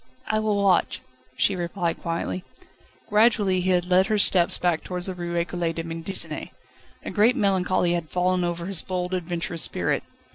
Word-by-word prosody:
"I 215 Hz, -, 0 dB
will 215 Hz, -1 st, 0 dB
watch," 200 Hz, -2 st, +2 dB, 0.4 s
she 195 Hz, -, +2 dB
replied 175 Hz, -1 st, -2 dB
quietly. 130 Hz, -, -3 dB, 0.6 s
Gradually 210 Hz, -4 st, +3 dB
he 185 Hz, -, -1 dB
had 180 Hz, -1 st, +2 dB
led 185 Hz, +1 st, +3 dB
her 215 Hz, -1 st, +1 dB
steps 180 Hz, -3 st, +4 dB
back 175 Hz, -3 st, 0 dB
towards 180 Hz, -1 st, -5 dB
the 190 Hz, -, -3 dB
Rue 175 Hz, -1 st, -5 dB
Ecole 170 Hz, -1 st, -1 dB
de 165 Hz, -, -4 dB
Médecine. 165 Hz, +3 st, -2 dB, 0.6 s
A -, -, -4 dB
great 225 Hz, +4 st, +4 dB
melancholy 185 Hz, -5 st, +1 dB
had 170 Hz, -3 st, -3 dB
fallen 180 Hz, 0 st, +1 dB
over 175 Hz, 0 st, -2 dB
his 190 Hz, -2 st, 0 dB
bold, 180 Hz, -1 st, -3 dB
adventurous 175 Hz, -2 st, -3 dB
spirit. -, -, 0 dB
180 Hz, 170 wpm, -24 LUFS, 170-195 Hz, 0.6 s, steps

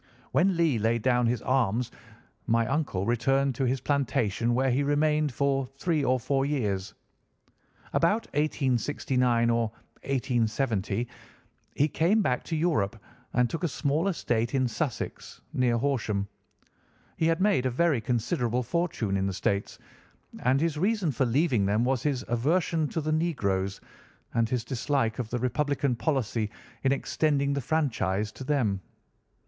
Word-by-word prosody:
When 175 Hz, +6 st, +3 dB
Lee 160 Hz, -9 st, +2 dB
laid 115 Hz, +1 st, +1 dB
down 125 Hz, -2 st, +3 dB
his 115 Hz, -2 st, -1 dB
arms 125 Hz, -2 st, +1 dB, 0.6 s
my 115 Hz, 0 st, +3 dB
uncle 135 Hz, -8 st, -1 dB
returned 135 Hz, +4 st, +2 dB
to 130 Hz, +2 st, -1 dB
his 130 Hz, +1 st, +1 dB
plantation, 120 Hz, -5 st, 0 dB
where 130 Hz, +1 st, +2 dB
he 130 Hz, +3 st, +2 dB
remained 150 Hz, +1 st, +2 dB
for 135 Hz, 0 st, 0 dB
three 160 Hz, -2 st, 0 dB
or 130 Hz, -1 st, +2 dB
four 135 Hz, +3 st, 0 dB
years. 105 Hz, -9 st, -1 dB, 1.0 s
About 210 Hz, +7 st, +2 dB
1869 125 Hz, -4 st, +1 dB
or 115 Hz, -1 st, +2 dB, 0.3 s
1870 120 Hz, -3 st, 0 dB, 0.7 s
he 145 Hz, -, +3 dB
came 180 Hz, +8 st, +2 dB
back 125 Hz, -8 st, 0 dB
to 165 Hz, -, -2 dB
Europe 155 Hz, -, 0 dB, 0.3 s
and 125 Hz, 0 st, +3 dB
took 165 Hz, +7 st, -5 dB
a -, -, +3 dB
small 150 Hz, +4 st, 0 dB
estate 120 Hz, -10 st, 0 dB
in 130 Hz, -1 st, +2 dB
Sussex, 120 Hz, +1 st, -4 dB
near 125 Hz, -2 st, +2 dB
Horsham. 115 Hz, -6 st, -1 dB, 0.9 s
He 160 Hz, -, +2 dB
had 165 Hz, +1 st, +2 dB
made 190 Hz, -10 st, +3 dB
a -, -, +1 dB
very 140 Hz, 0 st, +2 dB
considerable 120 Hz, +1 st, 0 dB
fortune 125 Hz, -, -1 dB
in 95 Hz, 0 st, 0 dB
the 95 Hz, -, -2 dB
States, 100 Hz, +1 st, -1 dB, 0.6 s
and 130 Hz, +2 st, +2 dB
his 155 Hz, -1 st, 0 dB
reason 195 Hz, -3 st, +1 dB
for 130 Hz, 0 st, 0 dB
leaving 130 Hz, -3 st, +2 dB
them 105 Hz, +3 st, +2 dB
was 130 Hz, -1 st, +1 dB
his 140 Hz, -4 st, -1 dB
aversion 155 Hz, +6 st, +1 dB
to 160 Hz, -, -3 dB
the 155 Hz, +1 st, -2 dB
negroes, 100 Hz, -, 0 dB, 0.5 s
and 115 Hz, -1 st, +1 dB
his 125 Hz, -2 st, -1 dB
dislike 130 Hz, -2 st, -1 dB
of 120 Hz, -3 st, -3 dB
the 125 Hz, -, -1 dB
Republican 135 Hz, +2 st, 0 dB
policy 115 Hz, -5 st, -1 dB, 0.3 s
in 135 Hz, -, +3 dB
extending 140 Hz, 0 st, +1 dB
the 140 Hz, -, -1 dB
franchise 110 Hz, -9 st, 0 dB
to -, -, -9 dB
them. 125 Hz, -9 st, 0 dB
130 Hz, 150 wpm, -28 LUFS, 115-150 Hz, 1.0 s, When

